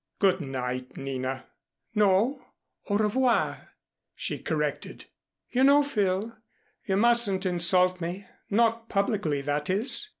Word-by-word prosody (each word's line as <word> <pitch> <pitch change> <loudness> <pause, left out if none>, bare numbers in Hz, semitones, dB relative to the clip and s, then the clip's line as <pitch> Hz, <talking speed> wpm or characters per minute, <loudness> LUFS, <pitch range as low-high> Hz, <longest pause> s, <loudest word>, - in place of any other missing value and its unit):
"Good 190 -2 +2
night, 130 -2 -5
Nina." 130 -1 -4 0.5
"No, 210 +6 +2 0.5
au 205 - +2
revoir," 235 +3 0 0.4
she - - -4
corrected. - - -3 0.5
"You 260 +1 +2
know, 285 +2 +6
Phil, 210 -4 -1 0.5
you 190 -1 +1
mustn't 220 -4 +3
insult 180 +1 +3
me 180 +4 -5 0.2
not 230 +1 +1
publicly, 200 -8 0
that 145 +2 -2
is. 235 - 0
195 Hz, 110 wpm, -27 LUFS, 165-230 Hz, 0.5 s, know